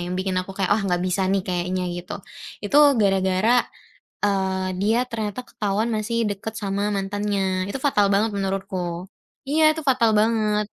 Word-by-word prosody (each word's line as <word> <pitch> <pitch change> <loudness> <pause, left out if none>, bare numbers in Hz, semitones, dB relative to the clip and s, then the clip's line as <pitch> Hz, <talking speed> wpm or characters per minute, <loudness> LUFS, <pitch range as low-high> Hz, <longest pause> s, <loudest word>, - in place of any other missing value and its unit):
yang - - -2
bikin 185 0 -1
aku 185 - -8
kayak, 195 -2 0
"Ah, 220 - 0
nggak 180 -3 0
bisa 185 +1 0
nih 195 -1 +1
kayaknya." 180 0 -1
Gitu. 180 +4 -6 0.5
Itu 245 +8 +3 0.2
gara-gara, 195 +3 +3 0.6
eee, 190 -2 0
dia 215 +4 +2
ternyata 220 +1 -3
ketahuan 210 +1 -2
masih 215 +2 -2
deket 205 +2 -5
sama 200 0 -1
mantannya, 195 -1 -1
itu 200 - -3
fatal 210 -8 +3
banget 215 +3 +2
menurutku. 190 -3 -3 0.4
Iya 310 +3 +2
itu 320 - -4
fatal 250 -4 +3
banget, 210 -1 +2
200 Hz, 155 wpm, -23 LUFS, 190-215 Hz, 0.6 s, Itu